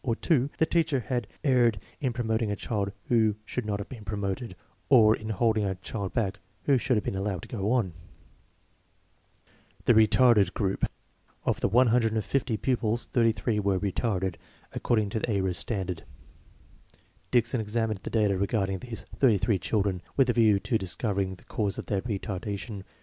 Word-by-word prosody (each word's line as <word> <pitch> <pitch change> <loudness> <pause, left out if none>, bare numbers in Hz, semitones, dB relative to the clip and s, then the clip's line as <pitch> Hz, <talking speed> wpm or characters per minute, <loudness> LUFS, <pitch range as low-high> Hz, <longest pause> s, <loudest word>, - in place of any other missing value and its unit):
or 115 -3 0 0.2
(&) 135 +4 -4
the 160 - +3
teacher 165 -5 +2
had 125 +1 -2 0.2
erred 120 -7 +3 0.2
in 130 -3 0
promoting 110 -2 -1
a 105 - -1
child 100 -2 -2 0.2
who 110 -3 +3
should 120 -2 -4
not 100 -1 -1
have 100 - -5
been 115 -5 -10
promoted, 100 +3 -3 0.3
or 110 -5 +7
in 110 - -8
holding 110 0 +2
a 95 -1 -1
child 95 +1 -5
back 100 -1 -1 0.2
who 140 - +4
should 125 -1 +1
have 105 - -1
been - - -2
allowed 95 -2 -2
to - - -8
go 105 -2 -2
on. 115 -9 +1 1.9
The - - +6
retarded 110 -2 +5
group. 95 -3 0 0.6
Of - - +1
the - - +1
150 115 +1 +2
pupils, 120 -2 0
83 115 -2 +2
were 100 -2 +1
retarded, 95 -2 -1 0.4
according 110 -4 +1
to 110 - -1
the - - -3
Ayres 95 -4 0
standard. 95 -6 -3 1.3
Dickson 120 0 +2
examined 110 -1 -1
the - - -5
data 105 -4 +2
regarding 95 -1 0
these 120 0 -6
33 105 -5 +3
children 95 -1 0 0.2
with 130 -3 +4
a - - -2
view 110 -4 +4
to 115 -4 0
discovering 95 0 -1
the - - -19
causes 105 -3 -2
of - - -5
their 100 -2 -1
retardation. 100 -1 -4
110 Hz, 165 wpm, -28 LUFS, 100-120 Hz, 1.9 s, or